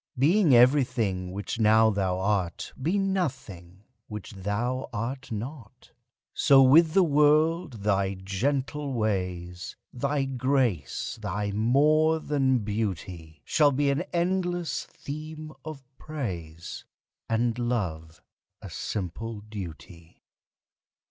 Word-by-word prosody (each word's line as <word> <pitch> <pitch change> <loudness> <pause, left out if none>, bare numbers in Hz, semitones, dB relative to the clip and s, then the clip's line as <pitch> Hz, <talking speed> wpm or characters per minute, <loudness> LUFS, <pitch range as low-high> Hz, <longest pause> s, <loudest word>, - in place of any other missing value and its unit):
Being 155 +2 +4
everything 120 -8 +3
which 100 +4 -5
now 110 0 +5
thou 95 -3 0
art, 95 -3 -1
Be 170 +9 +1
nothing 115 - -3 0.2
which 105 -2 -7
thou 110 +6 -2
art 125 +4 -4
not. 115 +1 -7 0.4
So 135 -1 +6
with 155 +5 +6
the 195 - +6
world 150 - +2
thy 100 -1 +1
gentle 135 +9 -2
ways, 90 -5 -3 0.2
Thy 140 +3 0
grace, 130 - -1
thy 100 +2 -2
more 150 +9 +3
than 135 -6 +1
beauty, 95 -7 -4
Shall 150 -2 +4
be 140 +1 +1
an 140 - 0
endless 175 -1 -1
theme 155 +1 -8
of 155 -3 -8 0.2
praise, 85 - -6 0.5
And 115 +1 0
love 85 -10 -3 0.4
a - - -10
simple 105 +3 -4
duty. 90 -5 -10
120 Hz, 105 wpm, -27 LUFS, 95-145 Hz, 0.5 s, So